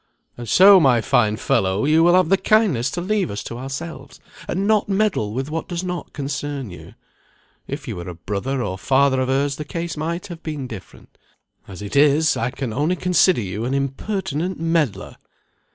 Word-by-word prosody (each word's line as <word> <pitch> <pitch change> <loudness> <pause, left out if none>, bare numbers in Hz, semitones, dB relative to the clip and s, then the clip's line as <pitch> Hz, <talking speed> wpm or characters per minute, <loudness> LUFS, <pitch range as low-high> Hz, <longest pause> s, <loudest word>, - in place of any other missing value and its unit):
"And 120 -2 -8
so, 195 - +8
my 130 -7 +4
fine 110 -1 +2
fellow, 95 +2 0
you 155 +2 +4
will 175 +1 +5
have 185 -3 +3
the 195 - +5
kindness 190 - +2
to 175 - -4
leave 200 0 0
us 100 0 -5
to 115 - -7
ourselves, 135 0 -7 0.3
and 190 +3 -1
not 215 -1 +2
meddle 195 - 0
with 135 +6 -4
what 165 +1 -3
does 175 -1 -4
not 180 -2 -5
concern 140 -4 -4
you. 90 - -12 0.7
If - - -6
you - - -5
were 90 +1 -6
a 90 - -7
brother, 105 +9 -3
or 95 -3 -4
father 135 +2 +2
of 130 - -1
hers, 135 +1 0
the 150 - -4
case 165 +2 -5
might 170 +5 -3
have 175 -4 -9
been 150 -4 -5
different. 110 -7 -12 0.5
As 95 0 -9
it 100 - -6
is, 150 +2 +4
I 115 - -1
can 125 -3 -5
only 150 +8 0
consider 180 -4 +3
you 100 +2 -4
an 130 +3 -1
impertinent 160 +4 -3
meddler." 165 -7 -1
140 Hz, 190 wpm, -21 LUFS, 120-175 Hz, 0.7 s, so